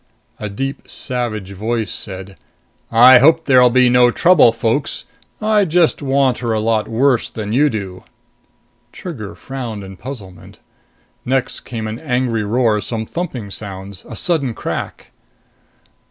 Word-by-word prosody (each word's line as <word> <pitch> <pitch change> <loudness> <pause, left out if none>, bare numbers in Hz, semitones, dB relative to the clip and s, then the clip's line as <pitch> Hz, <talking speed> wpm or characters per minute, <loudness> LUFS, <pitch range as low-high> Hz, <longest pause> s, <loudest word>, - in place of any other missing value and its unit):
A 105 - -4
deep, 135 +7 -5
savage 115 -6 -4
voice 110 +3 -2
said, 95 0 -7 0.6
"I 125 +2 +8
hope 160 +4 +4
there'll 125 -2 +6
be 125 +1 +4
no 125 0 +5
trouble, 170 -1 +5
folks. 115 +5 -2 0.3
I 215 -1 +2
just 170 -3 +2
want 135 -2 +1
her 115 -2 -1
a 110 - 0
lot 110 0 0
worse 125 +1 +1
than 105 -1 -5
you 145 +4 +4
do." 95 -6 -6 0.9
Trigger 125 - -8
frowned 120 -6 -6
in 95 0 -10
puzzlement. 100 -8 -10 0.7
Next 130 0 -1
came 115 -3 -6
an 110 +2 -5
angry 125 -6 -1
roar, 110 0 +1
some 110 0 -4
thumping 125 - -5
sounds, 100 -1 -8
a - - -7
sudden 140 -10 -1
crack. - - -5
120 Hz, 140 wpm, -18 LUFS, 105-135 Hz, 0.9 s, I